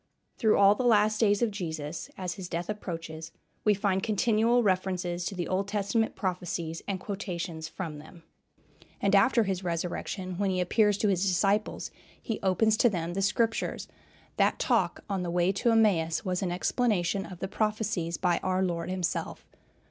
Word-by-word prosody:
Through 220 -3 +4
all 200 0 +7
the 210 - -3
last 215 -2 +4
days 205 0 +3
of 230 - +1
Jesus, 160 -5 -5
as 180 -2 -3
his 180 -2 -8
death 170 0 -3
approaches, 165 -5 -6 0.3
we 210 -1 +4
find 195 -1 0
continual 225 +3 +2
references 180 -2 0
to 195 - -3
the 175 -2 -3
Old 190 +1 -1
Testament 210 +2 0
prophecies, 175 -3 -3
and 195 -2 -2
quotations 175 -5 -5
from 160 -4 -6
them. 165 +3 -14 0.8
And 200 -1 +1
after 230 +4 +5
his 190 -2 -2
resurrection, 180 +2 -3
when 200 -1 +1
he 185 -1 0
appears 205 +3 +3
to 210 - +1
his 185 -3 +1
disciples, 195 +3 +1 0.3
he 225 - -4
"opens 215 +3 +2
to 240 - +5
them 175 -4 -3
the 195 - -1
Scriptures;" 225 +3 0 0.5
that - - +3
talk - - +1
on 195 -2 -2
the 175 - -3
way 175 +2 +2
to 200 +5 0
Emmaus 200 -6 +2
was 180 -1 -1
an 185 -2 -1
explanation 195 -1 0
of 180 - -9
the 190 - -4
prophecies, 210 -5 -1
by 175 -2 +1
our 185 0 0
Lord 170 -1 -2
himself. 185 -2 -3
190 Hz, 170 wpm, -28 LUFS, 175-210 Hz, 0.8 s, all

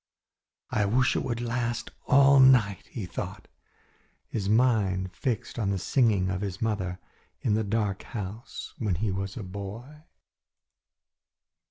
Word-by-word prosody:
"I 105 -1 +2
wish 125 +5 +2
it - - 0
would 120 -1 -2
last 120 0 -2 0.2
all 140 -1 +6
night," 120 -8 +5
he 110 -6 -5
thought, 90 - -6 0.8
his 100 -3 -2
mind 105 -6 +2
fixed 120 -1 -3
on 105 -4 0
the 100 - 0
singing 100 -2 +2
of 95 0 -2
his 95 -2 -4
mother 95 -5 -1 0.4
in 110 - +1
the 110 +1 +1
dark 105 -2 -1
house 110 +1 -7
when 105 -6 0
he 100 +4 -1
was 95 0 -4
a 115 - -4
boy. 100 +10 -8
105 Hz, 140 wpm, -28 LUFS, 95-120 Hz, 0.8 s, all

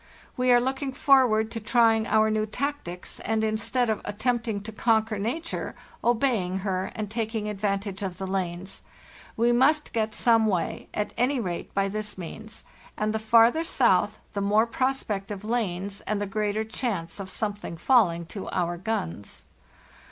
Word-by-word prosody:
We 250 0 +2
are 245 - +7
looking 265 +2 -2
forward 250 -6 +4
to 230 - -4
trying 225 0 +3
our 220 0 +3
new 215 0 0
tactics, 250 -8 -4
and 220 0 0
instead 220 +3 0
of 220 -2 -1
at 205 0 -6
tempting 230 -3 0
to 220 - -6
conquer 220 -1 +1
nature, 320 +11 -3 0.3
obeying 230 -6 +1
her 190 -1 -1
and 215 -1 -3
taking 220 0 -2
advantage 200 -1 -2
of 190 -3 -4
the 190 - -4
lanes. 185 0 -3 0.6
We 235 +2 +3
must 285 +5 +3
get 220 -2 -1
some 225 -2 +4
way, 185 -5 -1
at 210 - -3
any 255 +3 +2
rate, 180 -6 -4
by 195 0 +2
this 210 +1 -4
means; 215 +5 -8 0.3
and 215 0 0
the 220 - 0
farther 230 +7 +5
south 215 - +2 0.2
the. 200 - -2
more 210 +3 +3
prospect 235 -5 -1
of 205 -1 -6
lanes 200 -4 -2
and 215 -1 0
the 205 - -1
greater 210 +1 -1
chance 215 -7 -3
of 195 -1 -6
something 205 -6 -4
falling 175 -7 +3
to 195 +4 -7
our 175 -1 -1
guns. 100 - -4
215 Hz, 165 wpm, -26 LUFS, 195-235 Hz, 0.6 s, are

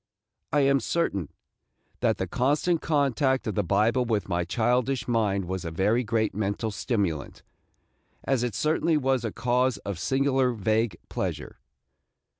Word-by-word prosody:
I 145 - +3
am 140 0 +4
certain 110 - -1 0.7
that - - +1
the - - -1
constant 150 +6 +1
contact 140 -3 +1
of 110 - -2
the 105 - +1
Bible 105 +7 +2
with 110 -4 -1
my 90 -2 0
childish 125 +6 0
mind 105 -5 +1
was 95 0 -4
a 85 - -3
very 105 +9 +1
great 110 -1 0
mental 105 +2 -2
stimulant, 100 - -2 0.8
as 135 -3 +1
it 120 -4 -2
certainly 155 - +1
was 135 -3 +1
a 115 - -2
cause 125 0 +1
of 100 -3 -3
a - - -10
singular 135 +3 +1
vague 110 -2 0
pleasure. - - -4
115 Hz, 150 wpm, -26 LUFS, 100-135 Hz, 0.8 s, am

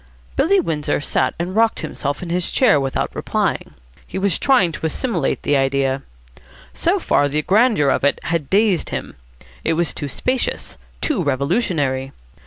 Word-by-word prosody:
Billy 390 +7 +3
Windsor 155 - -1
sat 130 -2 0
and 175 +3 -3
rocked 225 0 +2
himself 145 +4 -4
in 170 - -5
his 180 0 0
chair 220 - +4
without 135 -1 -2
replying. - - -2 0.3
He - - -6
was 190 -3 +1
trying 245 -11 +3
to 160 - -5
assimilate 170 - -1
this 145 - +2
idea. 135 0 +1 0.7
So 65 - +1
far 145 - +2
the 150 +2 -1
grandeur 210 - +3
of - - +1
it 145 - +3
had 160 -4 -2
dazed 200 -3 +2
him. - - -5 0.5
It - - +1
was 170 0 0
too 145 - -4
spacious, 255 - -2 0.3
too 290 - 0
revolutionary. 140 - 0
165 Hz, 160 wpm, -20 LUFS, 140-205 Hz, 0.7 s, chair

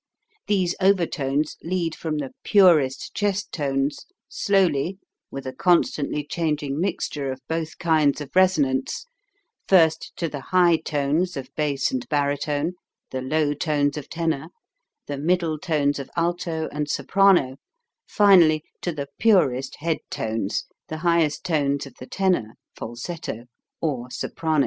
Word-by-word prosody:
These 185 -4 +2
overtones 155 -6 +1
lead 170 -2 -1
from 155 -2 -3
the 140 -3 -4
purest 165 -10 +4
chest 205 -1 -1
tones, 140 -1 -2 0.2
slowly, 185 -3 +1 0.3
witha 130 -1 -6
constantly 150 -3 +1
changing 150 -2 -2
mixture 150 -7 -2
of 130 - -6
both 160 0 -3
kinds 155 -4 +2
of 150 +1 -9
resonance, 155 - +2 0.6
first 165 -4 +4
to 170 - -1
the 145 -2 -5
high 175 +2 +4
tones 150 +4 -1
of 135 0 -7
bass 145 -3 0
and 125 -1 -3
baritone, 145 +2 0 0.4
the 130 - -3
low 145 +2 +1
tones 145 -1 0
of 150 -3 -7
tenor, 160 -3 -2 0.6
the 145 -1 -5
middle 165 0 +1
tones 145 -4 0
of 140 - -7
alto 170 -1 -1
and 150 0 -3
soprano, 180 -11 +3 0.5
finally 175 -7 +5 0.2
to 175 - -1
the 145 -3 -4
purest 135 - +3
head 165 0 0
tones, 110 -2 -2 0.2
the 155 - -5
highest 165 -3 +2
tones 145 -4 0
of 135 - -12
the 130 - -9
tenor 180 - 0 0.2
(falsetto), 120 0 -6 0.4
or 130 -6 -2
soprano. 160 +4 -1
155 Hz, 130 wpm, -24 LUFS, 140-175 Hz, 0.6 s, finally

